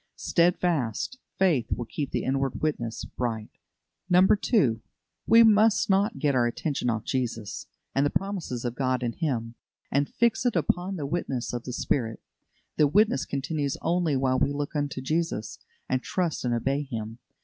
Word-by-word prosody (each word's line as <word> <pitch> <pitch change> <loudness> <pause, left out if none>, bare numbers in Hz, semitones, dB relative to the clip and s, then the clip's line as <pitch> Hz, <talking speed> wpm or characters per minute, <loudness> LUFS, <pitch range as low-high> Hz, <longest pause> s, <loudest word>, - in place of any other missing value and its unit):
Steadfast 170 - +1 0.2
faith 170 -11 +2
will 120 - -1
keep 140 +4 -4
the - - -2
inward 135 0 -1
witness 120 -7 -2
bright. 115 -3 -4 0.6
2. 180 - +4 0.5
We 230 +1 +8
must 215 -1 +4
not 200 +4 +2
get 145 -3 +1
our 120 -2 +3
attention 135 +1 -2
off 115 -2 -1
Jesus, 120 -5 -3 0.3
and 135 - +2
the 145 - +2
promises 180 -12 -3
of 120 - -1
God 130 -1 0
in 120 -1 -1
Him, 120 -8 -2 0.4
and 140 +1 +1
fix 235 -1 +1
it 245 -4 +1
upon 180 +3 0
the 150 -5 -4
witness 140 -6 -2
of 120 -1 -4
the 125 - -4
Spirit. 115 -3 -1 0.6
The 150 - +5
witness 195 -3 +3
continues 140 0 -2
only 165 -3 +1
while 130 -1 +1
we 140 - +2
look 145 +2 -4
unto 145 -2 -2
Jesus, 155 -6 -2 0.3
and 130 -1 0
trust 175 0 -2
and 120 -1 +1
obey 135 +5 0
Him. 115 -4 -6
140 Hz, 160 wpm, -27 LUFS, 120-175 Hz, 0.6 s, We